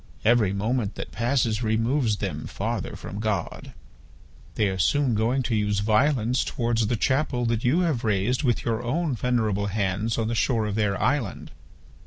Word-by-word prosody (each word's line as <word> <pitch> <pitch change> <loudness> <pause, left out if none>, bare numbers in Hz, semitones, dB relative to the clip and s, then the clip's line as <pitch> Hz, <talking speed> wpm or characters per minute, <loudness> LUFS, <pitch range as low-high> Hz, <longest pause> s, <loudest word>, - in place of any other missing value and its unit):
Every 110 -4 +4
moment 105 +2 -1
that - - -6
passes 120 -2 0
removes 115 +1 +1
them 85 -8 -4
farther - - -3
from 100 - -7
God. 105 -5 -3 0.8
They 105 - +2
are 95 -1 -4
soon 135 - +2
going 115 +5 +1
to 120 -2 -1
use 105 -1 0
violence 120 +2 +2
towards 115 -2 0
the 120 - +1
chapel 130 +1 0
that 115 -1 0
you 145 +9 +3
have 155 -9 0
raised 110 +4 +1
with 125 -6 0
your 115 -1 0
own 145 +5 -1
venerable 110 -4 0
hands 100 +2 -1
on 115 -1 0
the 115 - -1
shore 115 -1 +1
of 105 - -2
their 105 -2 0
island. 130 -9 -1
115 Hz, 170 wpm, -25 LUFS, 105-125 Hz, 0.8 s, Every